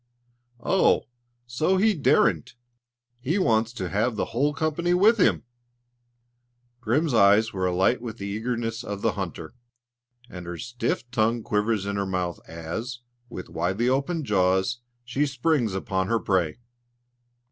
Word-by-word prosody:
"Oh! 190 - +3 0.4
so 155 +10 +1
he 215 +3 +4
daren't! 125 - +2 0.6
He 150 +10 -1
wants 115 - +2
to 95 -6 -4
have 110 +5 0
the - - -1
whole 140 +5 +2
company 160 +4 0
with 215 +5 +4
him!" - - +3 1.4
Grim's 130 +6 0
eyes 110 +1 +5
are 95 -1 0
alight 95 +7 +2
with 115 -2 -6
the 100 - -6
eagerness 115 +2 -3
of 100 -1 -6
the - - +3
hunter, - - -6 0.7
and 90 -4 -9
her 85 0 -5
stiff 120 +1 -3
tongue 115 -1 +1
quivers 105 -1 0
in 100 0 -2
her 100 -1 -1
mouth 90 -2 -2
as, 110 +10 -6 0.3
with 95 -6 -7
widely 95 +9 -1
opened 140 +4 -1
jaws, 95 +2 +1 0.3
she 135 +5 0
springs 130 -6 0
upon 95 -1 -1
her 115 +2 +2
prey. 95 -7 0
115 Hz, 140 wpm, -25 LUFS, 95-130 Hz, 1.4 s, eyes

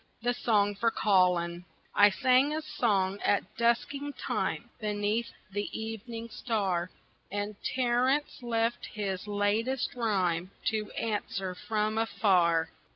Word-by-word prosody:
The 245 0 +2
Song 205 -4 +2
for 230 +3 +1
Colin 180 -5 +2 0.3
I 205 0 +7
sang 255 +7 +3
a 315 - -3
song 200 -8 +1
at 205 0 0
dusking 275 +5 0
time - - -2
Beneath 210 +1 -1 0.2
the 205 +1 -2
evening 225 +1 -5
star, 195 -8 -1 0.4
And 205 +1 -3 0.2
Terence 255 +4 +1
left 230 0 0
his 200 -2 -3
latest 210 +5 0
rhyme 185 -7 0 0.2
To 215 -1 -2
answer 200 -4 -2
from 215 +3 -1
afar. 185 -7 +2
215 Hz, 115 wpm, -30 LUFS, 195-235 Hz, 0.4 s, I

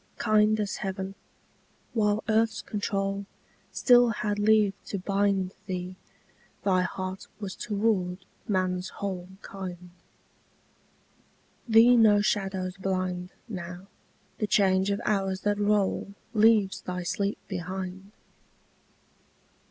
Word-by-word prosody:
Kind 215 -1 +3
as 205 -2 -2
heaven, 190 -1 -4 0.8
while 210 -2 +1
earth's 225 0 +1
control 200 -1 -2 0.4
Still 245 -1 +5
had 210 -1 -2
leave 210 -1 +4
to 200 - -3
bind 195 0 0
Thee, 185 -1 -4 0.7
thy 185 -2 +3
heart 185 +1 -4
was 200 -3 -5
toward 195 -4 -1 0.2
man's 185 -2 0
whole 185 -3 -5 0.2
Kind. 180 -2 -8 1.8
Thee 230 +2 +7
no 215 -3 +6
shadows 195 -2 -1
blind 185 -1 -2 0.2
Now: 180 -3 -7 0.5
the 210 - 0
change 190 -1 +3
of 200 - 0
hours 195 -2 0
that 205 0 0
roll 205 -1 +1 0.2
Leaves 215 -3 +4
thy 180 0 -4
sleep 200 +3 -1
behind. 190 +1 -5
195 Hz, 105 wpm, -27 LUFS, 185-210 Hz, 1.8 s, Thee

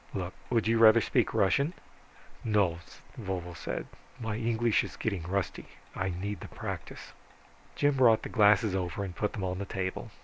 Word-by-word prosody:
Look, 90 -2 -3 0.2
would 115 -3 +1
you 115 0 +3
rather 115 0 +8
speak - - +1
Russian?" 140 - +2 0.7
"No," 100 -6 +2 0.4
Vovo 90 -4 -4
said, 85 - -4 0.3
"my 110 -2 -3
English 115 0 +1
is - - -7
getting 100 -5 -2
rusty. 90 0 -3 0.3
I 95 0 -1
need 95 +3 -4
the - - -8
practice." - - -7 0.6
Jim 145 -1 +2
brought 115 -4 +5
the - - -4
glasses 105 -2 +4
over 95 +1 -2
and 90 -3 -6
put 105 - -1
them 100 - -4
on 90 0 -2
the 100 - -3
table. 95 -1 -4
100 Hz, 170 wpm, -30 LUFS, 95-115 Hz, 0.7 s, rather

